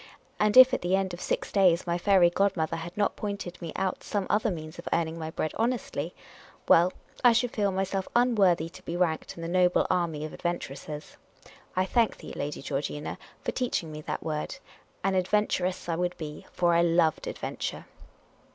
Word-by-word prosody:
And 210 +2 +3
if 255 0 +10
at - - 0
the 180 +2 +2
end 190 -2 -1
of 175 - -7
six - - -2
days 185 -4 +4
my 170 0 -1
fairy 185 -2 +5
godmother 175 -4 +1
had 170 +3 -8
not 205 - +1
pointed 200 -4 -5
me 165 -2 -5
out 190 -1 -2
some 205 -3 -2
other 210 - +2
means 155 -4 -6
of - - -9
earning 165 0 0
my 160 0 -4
bread 155 -1 -2
honestly 235 +2 -2 0.3
— - - -24
well, 175 +2 +6 0.3
I 245 -1 +7
should 240 +1 +1
feel 205 -2 +1
myself 190 0 -1
unworthy 200 -9 +4
to 185 +2 -13
be 175 -1 -4
ranked 170 -3 0
in 165 - -8
the - - -3
noble 180 0 +3
army 165 -4 0
of 155 - -7
adventuresses. 150 -3 -5 0.6
I 185 0 +2
thank 230 +3 +2
thee, - - -9
Lady 145 -1 -4
Georgina, 145 +1 -3 0.2
for - - -1
teaching 235 -10 -2
me 155 0 -7
that - - -4
word. 150 -1 -3 0.5
An 195 0 +2
adventuress 185 -1 0
I 170 - 0
would 180 +1 -1
be; 150 -2 -7
for 175 -1 +2
I 170 - +5
loved 165 -2 +2
adventure. - - -4
180 Hz, 190 wpm, -28 LUFS, 165-195 Hz, 0.6 s, if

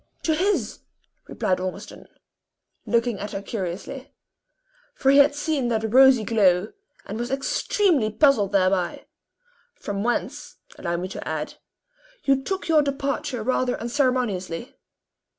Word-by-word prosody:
"To 320 - +2
his," 380 +6 0 0.5
replied 185 - -1
Ormiston, 185 0 -7 0.8
looking 235 -2 +1
at 205 0 -6
her 195 - -3
curiously; 210 +8 -5 0.8
for 270 - +3
he 280 - +6
had 285 +1 +5
seen 290 -3 -1
that 220 -1 -1
rosy 265 -3 +7
glow, 200 -3 +2 0.4
and 210 +3 -6
was 240 +1 -3
extremely 275 - +1
puzzled 220 -4 +3
thereby; 185 -2 +1 0.7
"from 200 -1 -4
whence, 240 +1 -3 0.2
allow 170 -1 -2
me 180 +2 -3
to - - -7
add, 155 -1 -3 0.7
you 270 -1 +2
took 385 +7 -3
your 315 -2 +5
departure 280 -3 -2
rather 255 +1 0
unceremoniously." 240 - -1
240 Hz, 125 wpm, -24 LUFS, 195-275 Hz, 0.8 s, rosy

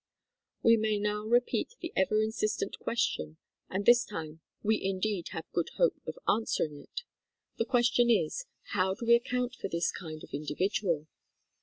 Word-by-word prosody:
We 230 0 +7
may 215 -1 +1
now 210 +1 -1
repeat 245 - +1
the 340 -2 -6
ever 215 +3 +3
insistent 215 -2 -1
question, 80 - -1 0.3
and 195 +2 -2
this 240 0 +7
time 160 -5 -7 0.2
we 220 +1 +2
indeed 195 -1 -1
have 160 - -6
good 170 - 0
hope - - +2
of - - -4
answering 165 -8 +1
it. 485 - -7 0.6
The 230 - +2
question 240 -1 +3
is, 225 - +1 0.3
"How 190 -1 +2
do 235 - -6
we 235 - +6
account 245 +1 +1
for - - -5
this 170 0 0
kind 155 -3 -8
of - - -13
individual 155 +2 0
210 Hz, 160 wpm, -31 LUFS, 170-235 Hz, 0.6 s, We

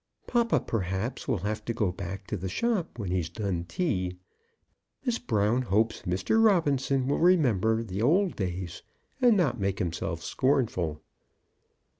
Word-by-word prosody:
Papa, 235 -2 +2
perhaps, 100 +4 -3
will 125 - +1
have 110 +1 -2
to 115 - -2
go 105 -6 +1
back 95 +1 -6
to - - -3
the 95 +2 -4
shop 205 - -1
when 100 -6 -3
he's 90 -3 0
done 95 -6 -3
tea. 90 - -1 0.9
Miss 240 -2 0
Brown 110 +2 +1
hopes 110 -1 +1
Mr. 95 - +2
Robinson 140 - +2
will 140 - +1
remember 115 - +3 0.2
old 175 - +3
days, 90 -3 -4 0.4
and 240 -4 +6
not 135 - +1
make 95 -1 0
himself 85 -2 -3
scornful. 110 - 0
110 Hz, 140 wpm, -28 LUFS, 95-145 Hz, 0.9 s, and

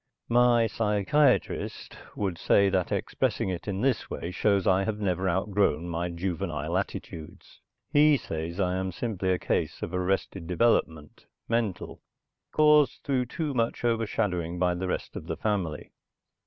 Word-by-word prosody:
My 120 -1 +4
psychiatrist 110 +6 +1 0.2
would 95 -5 -2
say 100 0 +4
that 95 -2 0
expressing - - -1
it 90 +1 -5
in 100 -1 -2
this 135 0 0
way 85 - -5
shows 100 +1 +1
I 95 -1 +3
have 105 +1 -2
never 95 -2 0
outgrown 95 -3 +1
my 85 +1 -2
juvenile 85 -2 -3
attitudes. 85 -4 -6 0.3
He 150 0 +6
says 80 -3 -5
I 90 -1 +1
am 95 0 -2
simply 95 -1 -3
a 90 - +2
case - - -2
of - - -5
arrested 90 -1 -1
development, 85 -5 0 0.2
mental, 115 -6 -2 0.5
caused 150 -2 +4
through 130 -3 0
too 150 +2 -3
much 115 -1 -1
over 115 -1 +1
shadowing 90 -6 -1
by 90 0 +2
the 90 +1 -3
rest - - -4
of - - -7
the - - -3
family. 95 -8 -2
95 Hz, 150 wpm, -27 LUFS, 90-115 Hz, 0.5 s, He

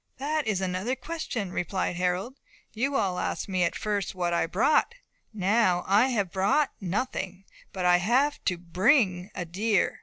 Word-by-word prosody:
"That 300 +1 -1
is 200 -3 0
another 190 +7 -1
question," 265 - -4
replied 180 0 -2
Harold. 180 +9 -2 0.3
"You 265 +6 -1
all 185 -7 0
asked - - -2
me 185 -2 -1
at 170 - 0
first 205 -3 -2
what 175 -1 -1
I 170 - +2
had 165 - -2
brought. 305 - +2 0.4
Now, 200 -3 +2
I 205 +6 +4
have 205 -8 -1
brought 200 +10 +2
nothing; 195 -1 -3 0.3
but 185 -2 -3
I 180 0 +6
have 255 +10 +1
to 180 - +1
bring 185 - +2
a 180 - -3
deer." 200 +4 0
195 Hz, 170 wpm, -27 LUFS, 180-240 Hz, 0.4 s, I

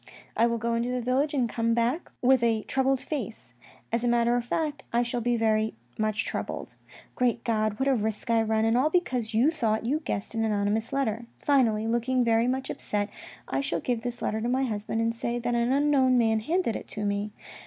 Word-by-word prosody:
" - - -24
I 230 +2 +4
will 235 0 0
go 230 +1 -1
into 235 +1 0
the 250 0 -1
village 255 +5 +1
and 250 -4 +2
come 230 0 0
back 240 +8 0
with 260 0 +5
a 225 -2 +1
troubled 265 0 +1
face. 235 - -6 0.4
As 230 +1 0
a - - +1
matter 240 0 +3
of 245 - 0
fact 295 +4 -2
I 235 +1 +2
shall 240 0 -2
be 240 +1 +1
very 220 -1 +1 0.2
much 215 0 0
troubled. - - -4 0.4
Great 240 -2 0
God! 215 -2 0
What 265 - 0
a 275 - +4
risk 220 0 -2
I 230 -1 +4
run, 220 0 +1
and 225 +1 +2
all 265 +5 +3
because 250 -10 0
you 255 +8 +4
thought 230 -8 0
you 285 +6 +1
guessed 220 -10 -4
an 225 -1 0
anonymous 215 +2 0
letter. 240 -4 -1
Finally, 235 -7 +2
looking 240 +2 +1
very 230 0 +3
much 260 +1 -1
upset, 205 0 -1 0.4
I - - -1
shall 270 - -1
give 240 -3 -1
this 240 0 -5
letter 220 +1 -1
to 235 - -1
my 260 +2 +1
husband 220 -2 -2
and 230 0 +1
say 235 +1 -2
that 240 0 -1
an 235 +1 +1
unknown 275 -2 +3
man 225 -2 +3
handed 310 +1 0
it - - -6
to 210 -1 -5
me. 205 +1 -1
235 Hz, 220 wpm, -27 LUFS, 220-255 Hz, 0.4 s, with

